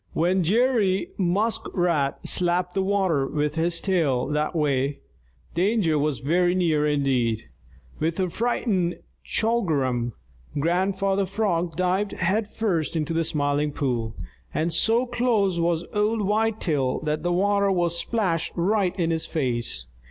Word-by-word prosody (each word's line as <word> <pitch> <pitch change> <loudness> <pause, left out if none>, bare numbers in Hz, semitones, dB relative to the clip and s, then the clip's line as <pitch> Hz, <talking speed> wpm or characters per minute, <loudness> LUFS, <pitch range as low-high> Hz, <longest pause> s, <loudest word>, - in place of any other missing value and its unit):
When 180 +3 +2
Jerry 210 -1 +2
Muskrat 175 -6 0
slapped 180 0 +1
the 195 - +1
water 190 -8 +1
with 150 0 -1
his 165 +1 0
tail 155 -10 +1
that 150 +3 -1
way, 140 -2 0 0.6
danger 180 -4 +2
was 145 -2 -1
very 175 +5 +2
near 160 -5 +2
indeed. 130 -6 0 0.5
With 165 +3 -1
a 185 -2 0
frightened 210 -6 0 0.3
"Chugarum!" 135 - 0 0.4
Grandfather 190 +4 +1
Frog 175 -7 -1
dived 185 +3 0
head 205 +4 0
first 180 -10 -1
into 160 +1 -1
the 165 0 +1
Smiling 145 -1 0
Pool, 120 -6 -2 0.4
and 165 +1 -1
so 230 +8 +3
close 230 -7 +1
was 170 0 0
old 210 +1 +1
Whitetail 200 -10 0
that 150 0 -2
the 175 - -1
water 200 +2 +2
was 175 -2 +1
splashed 180 -4 -1
right 190 +1 +1
in 165 -1 +1
his 160 -1 -1
face. 120 - -1
175 Hz, 130 wpm, -24 LUFS, 150-200 Hz, 0.6 s, so